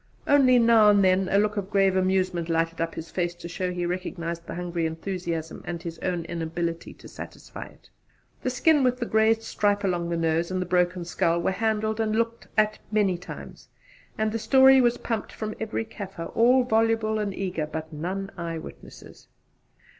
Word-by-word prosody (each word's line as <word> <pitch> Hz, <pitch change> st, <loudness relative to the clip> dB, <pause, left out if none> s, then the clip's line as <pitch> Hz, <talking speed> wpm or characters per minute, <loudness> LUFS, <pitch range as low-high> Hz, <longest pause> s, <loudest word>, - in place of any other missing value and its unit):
Only 265 Hz, -3 st, +5 dB
now 230 Hz, -3 st, +6 dB
and 205 Hz, -1 st, +5 dB
then 185 Hz, 0 st, +3 dB
a 200 Hz, -, +3 dB
look 210 Hz, +1 st, +1 dB
of 195 Hz, -1 st, -3 dB
grave 195 Hz, -2 st, +3 dB
amusement 185 Hz, -2 st, +1 dB
lighted 165 Hz, 0 st, 0 dB
up 165 Hz, 0 st, -2 dB
his 160 Hz, 0 st, -7 dB
face 175 Hz, -1 st, -1 dB
to 175 Hz, 0 st, -9 dB
show 180 Hz, +2 st, -3 dB
he 175 Hz, -1 st, -2 dB
recognised 170 Hz, -1 st, -4 dB
the -, -, -6 dB
hungry 175 Hz, -1 st, -2 dB
enthusiasm 165 Hz, -1 st, -4 dB
and 175 Hz, -1 st, -5 dB
his 165 Hz, -1 st, -7 dB
own 175 Hz, -3 st, -2 dB
inability 165 Hz, 0 st, -4 dB
to -, -, -14 dB
satisfy -, -, -9 dB
it. -, -, -20 dB, 0.5 s
The -, -, -1 dB
skin 290 Hz, +3 st, +3 dB
with 250 Hz, -1 st, +2 dB
the 240 Hz, -, -2 dB
grazed 220 Hz, 0 st, +2 dB
stripe 205 Hz, -2 st, 0 dB
along 175 Hz, -3 st, -1 dB
the 170 Hz, -, -1 dB
nose, 165 Hz, +1 st, 0 dB
and 185 Hz, 0 st, -2 dB
the 185 Hz, -, -1 dB
broken 180 Hz, 0 st, +1 dB
skull, 170 Hz, 0 st, +1 dB
were 170 Hz, -, 0 dB
handled 220 Hz, +1 st, -1 dB
and 215 Hz, -1 st, 0 dB
looked 230 Hz, +1 st, -1 dB
at 215 Hz, 0 st, +2 dB
many 205 Hz, -4 st, +2 dB
times, 175 Hz, +2 st, -10 dB, 0.5 s
and 215 Hz, 0 st, 0 dB
the 225 Hz, -, -2 dB
story 265 Hz, +2 st, +6 dB
was 240 Hz, -1 st, +2 dB
pumped 225 Hz, -3 st, -3 dB
from 215 Hz, -1 st, -5 dB
every 220 Hz, 0 st, -3 dB
Kaffir 195 Hz, -6 st, -7 dB
all 250 Hz, +3 st, +5 dB
voluble 225 Hz, -2 st, +1 dB
and 205 Hz, -1 st, -1 dB
eager, 180 Hz, -5 st, -3 dB
but 160 Hz, +1 st, -6 dB
none 190 Hz, +6 st, -4 dB
eye 165 Hz, -1 st, -4 dB
witnesses. 160 Hz, -, -12 dB
190 Hz, 190 wpm, -26 LUFS, 170-220 Hz, 0.5 s, now